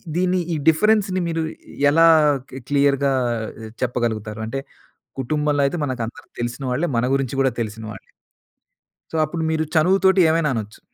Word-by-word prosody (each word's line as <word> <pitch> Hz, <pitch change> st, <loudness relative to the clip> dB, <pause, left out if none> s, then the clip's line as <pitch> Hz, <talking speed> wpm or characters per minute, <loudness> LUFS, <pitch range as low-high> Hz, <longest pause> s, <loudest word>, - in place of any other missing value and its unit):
దీన్ని 185 Hz, +1 st, +1 dB
ఈ -, -, 0 dB
డిఫరెన్స్‌ని 195 Hz, +2 st, +2 dB
మీరు 165 Hz, -1 st, -1 dB, 0.5 s
ఎలా 165 Hz, +3 st, +5 dB, 0.5 s
కి 130 Hz, -, -7 dB
క్లియర్‌గా 140 Hz, -1 st, +2 dB, 0.7 s
చెప్పగలుగుతారు? 110 Hz, -3 st, -2 dB
అంటే 135 Hz, +4 st, -3 dB, 0.6 s
కుటుంబంలో 150 Hz, +2 st, 0 dB
అయితే 175 Hz, -, -3 dB
మనకందరు 120 Hz, -4 st, -5 dB
తెలిసిన 120 Hz, +3 st, -4 dB
వాళ్ళే. 155 Hz, +8 st, 0 dB
మన 120 Hz, -, +1 dB
గురించి 135 Hz, -1 st, -2 dB
కూడా 135 Hz, -1 st, +2 dB
తెలిసిన 110 Hz, 0 st, -5 dB
వాళ్ళే. 100 Hz, -, -9 dB, 1.1 s
సో -, -, -6 dB
అప్పుడు 160 Hz, +1 st, -4 dB
మీరు 160 Hz, 0 st, 0 dB
చనువుతోటి 190 Hz, +3 st, +4 dB
ఏమైనా 160 Hz, -3 st, +1 dB
అనొచ్చు. 105 Hz, -1 st, -6 dB
145 Hz, 135 wpm, -21 LUFS, 120-165 Hz, 1.1 s, ఎలా